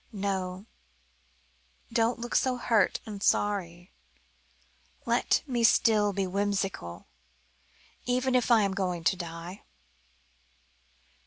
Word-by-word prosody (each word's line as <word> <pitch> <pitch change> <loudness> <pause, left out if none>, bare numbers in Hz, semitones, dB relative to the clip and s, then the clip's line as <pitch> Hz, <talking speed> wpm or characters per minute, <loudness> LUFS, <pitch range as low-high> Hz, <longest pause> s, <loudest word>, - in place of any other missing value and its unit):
"No, 190 -2 -3 1.3
don't 230 0 +2
look 240 +1 -6
so 255 -1 +2
hurt 225 -5 +2
and 210 -3 -7
sorry. 180 -4 0 1.1
Let - - +2
me 245 -4 -1
still 215 -2 +4
be 195 0 -1
whimsical, 195 - -2 1.0
even 250 +1 +1
if 250 -1 +2
I 230 -3 +5
am 195 -1 0
going 180 -3 -2
to 190 - +3
die. 170 +1 -7
200 Hz, 100 wpm, -28 LUFS, 185-230 Hz, 1.3 s, I